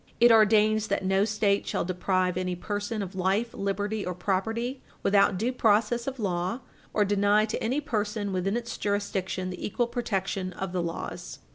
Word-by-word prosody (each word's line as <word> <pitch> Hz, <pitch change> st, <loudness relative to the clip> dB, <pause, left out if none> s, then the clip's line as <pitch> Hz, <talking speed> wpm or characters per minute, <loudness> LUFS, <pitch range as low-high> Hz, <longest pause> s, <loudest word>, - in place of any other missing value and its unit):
It 240 Hz, 0 st, +7 dB
ordains 215 Hz, 0 st, +5 dB
that 190 Hz, -, -1 dB
no 195 Hz, +1 st, +3 dB
State 210 Hz, -2 st, +1 dB
shall -, -, -1 dB
deprive 185 Hz, 0 st, 0 dB
any 185 Hz, 0 st, -1 dB
person 205 Hz, +3 st, -3 dB
of 190 Hz, 0 st, -7 dB
life, 190 Hz, +5 st, 0 dB
liberty, 205 Hz, +2 st, -2 dB
or 180 Hz, -1 st, -3 dB
property 225 Hz, +8 st, -1 dB, 0.2 s
without 200 Hz, -1 st, +4 dB
due 235 Hz, +6 st, 0 dB
process 230 Hz, +1 st, +2 dB
of 270 Hz, -1 st, -3 dB
law, 185 Hz, +2 st, -2 dB, 0.3 s
or 210 Hz, -, +2 dB
deny 205 Hz, +1 st, +3 dB
to 220 Hz, -, -4 dB
any 260 Hz, +6 st, 0 dB
person 210 Hz, -5 st, -2 dB
within 195 Hz, +4 st, 0 dB
its 235 Hz, -1 st, -5 dB
jurisdiction 190 Hz, -2 st, -2 dB
the 180 Hz, -, -7 dB
equal 240 Hz, +4 st, 0 dB
protection 195 Hz, -6 st, -2 dB
of 190 Hz, +1 st, -4 dB
the 180 Hz, -1 st, -1 dB
laws. 170 Hz, -1 st, -5 dB
205 Hz, 170 wpm, -27 LUFS, 190-225 Hz, 0.3 s, It